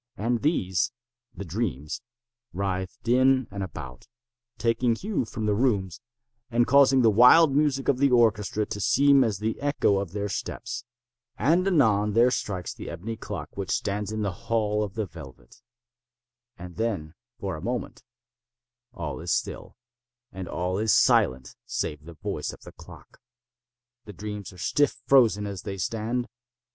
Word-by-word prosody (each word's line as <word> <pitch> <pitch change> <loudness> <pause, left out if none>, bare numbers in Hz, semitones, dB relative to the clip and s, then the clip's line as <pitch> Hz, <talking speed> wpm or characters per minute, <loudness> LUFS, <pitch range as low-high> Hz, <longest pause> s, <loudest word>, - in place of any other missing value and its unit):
And 115 +2 0
these—the 120 - -2
dreams—writhed 100 - -5
in 130 +1 +4
and 100 0 -5
about, 65 - -8 0.5
taking 115 +1 +1
hue 195 - -2
from 110 0 -5
the 105 - +2
rooms, 100 -5 0 0.5
and 120 0 +2
causing 135 -1 +5
the 110 - +6
wild 135 +7 +7
music 145 -2 +1
of 135 -3 +2
the 140 0 +4
orchestra 110 -3 +2
to 105 - -5
seem 140 +4 +5
as 110 -5 -1
the 110 +2 -3
echo 140 -8 +2
of 100 -4 -4
their 105 0 -2
steps. 120 +4 -5 0.5
And, 170 - +2
anon, 110 - +3
there 120 +3 +5
strikes 95 -7 -3
the - - -8
ebony 100 +7 -5
clock 105 -2 -7
which 100 -1 -4
stands 105 0 -1
in 110 0 -2
the 100 - -1
hall 105 +2 -1
of 100 -2 -6
the 110 -2 -1
velvet. 70 -9 -13 1.0
And 90 0 -10
then, 100 -9 -2 0.3
for - - -3
a - - -8
moment, - - -4 0.9
all - - -5
is - - -4
still, - - -3 0.5
and 95 -1 -7
all 90 +2 -2
is 110 0 +2
silent 65 -7 +3
save 75 0 -3
the 85 0 -11
voice - - -4
of - - -14
the - - -12
clock. - - -15 0.9
The 105 - -9
dreams 105 0 -6
are 90 - -15
stiff 145 +10 +1
frozen 115 -6 +4
as 100 -2 -5
they 100 -2 -6
stand. 115 +6 -2
110 Hz, 155 wpm, -26 LUFS, 95-125 Hz, 1.0 s, wild